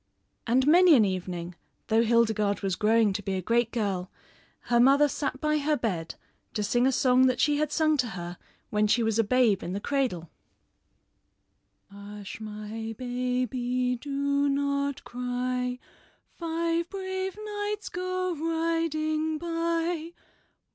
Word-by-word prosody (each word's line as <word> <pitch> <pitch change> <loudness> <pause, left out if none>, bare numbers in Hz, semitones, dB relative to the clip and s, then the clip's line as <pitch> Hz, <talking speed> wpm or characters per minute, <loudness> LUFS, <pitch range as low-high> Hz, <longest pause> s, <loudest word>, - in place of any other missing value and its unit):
And 255 +3 +3
many 345 +2 +7
an 225 -5 +5
evening, 180 -2 -4 0.3
though 225 +1 +3
Hildegarde 220 -3 +2
was 190 -2 0
growing 215 0 +3
to 205 - -3
be 195 -1 -3
a 185 - -2
great 235 +3 +1
girl, 195 -5 -2 0.5
her 240 -1 +1
mother 275 +4 +6
sat 275 -2 -3
by 305 +1 +1
her 300 +1 +1
bed 180 -9 -3 0.4
to 210 - 0
sing 240 +5 +2
a - - +3
song 255 0 +4
that 255 -1 0
she 295 -1 +3
had 300 0 0
sung 310 -1 +2
to 250 -3 +1
her 175 0 -7 0.3
when 210 0 +2
she 235 +3 +2
was 225 0 +1
a - - +5
babe 225 -3 +3
in 180 - -4
the 200 - -2
cradle: 240 - -2 1.6
"Hush, 200 0 -9
my 215 +1 -6
baby, 250 0 -1
do 280 +2 0
not 280 0 -1
cry, 250 0 -2 0.6
Five 335 0 -1
brave 380 0 -4
knights 415 0 -4
go 370 0 -2
riding 320 -1 -1
by. 335 0 -2
255 Hz, 140 wpm, -27 LUFS, 220-310 Hz, 1.6 s, many